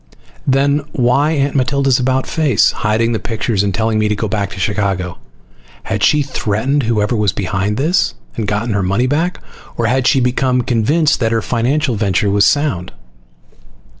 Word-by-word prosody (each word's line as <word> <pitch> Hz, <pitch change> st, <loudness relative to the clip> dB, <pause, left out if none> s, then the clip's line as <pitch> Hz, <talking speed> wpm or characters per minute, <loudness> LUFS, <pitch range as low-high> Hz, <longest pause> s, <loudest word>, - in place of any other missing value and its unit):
Then 140 Hz, +2 st, +2 dB
why 140 Hz, +2 st, +2 dB
Aunt 140 Hz, -2 st, 0 dB
Matilda's 135 Hz, 0 st, +2 dB
about 130 Hz, +1 st, 0 dB
face, 155 Hz, -5 st, +2 dB
hiding 110 Hz, +2 st, 0 dB
the 110 Hz, -, -1 dB
pictures 110 Hz, -2 st, -2 dB
and 100 Hz, -1 st, 0 dB
telling 110 Hz, +1 st, 0 dB
me 105 Hz, -, +1 dB
to 105 Hz, -, 0 dB
go 110 Hz, +2 st, -2 dB
back 100 Hz, -2 st, -2 dB
to 95 Hz, -, -9 dB
Chicago? 95 Hz, -3 st, -2 dB, 0.6 s
Had -, -, -3 dB
she 150 Hz, -1 st, +4 dB
threatened 130 Hz, +2 st, -1 dB
whoever 110 Hz, -2 st, 0 dB
was 105 Hz, -3 st, +1 dB
behind 100 Hz, +1 st, -2 dB
this, 140 Hz, -5 st, +1 dB, 0.2 s
and 110 Hz, -3 st, -3 dB
gotten 105 Hz, +2 st, -1 dB
her 100 Hz, -, 0 dB
money 100 Hz, +7 st, 0 dB
back? 160 Hz, +7 st, -1 dB, 0.4 s
Or 115 Hz, -, 0 dB
had 125 Hz, +2 st, +1 dB
she -, -, +3 dB
again 130 Hz, -, +2 dB
become 125 Hz, 0 st, +1 dB
convinced 145 Hz, +8 st, +1 dB
that 115 Hz, -3 st, 0 dB
her 115 Hz, -2 st, 0 dB
financial 130 Hz, +3 st, 0 dB
venture 100 Hz, -1 st, 0 dB
was 100 Hz, 0 st, +4 dB
sound? 140 Hz, -, 0 dB
115 Hz, 175 wpm, -16 LUFS, 105-135 Hz, 0.6 s, she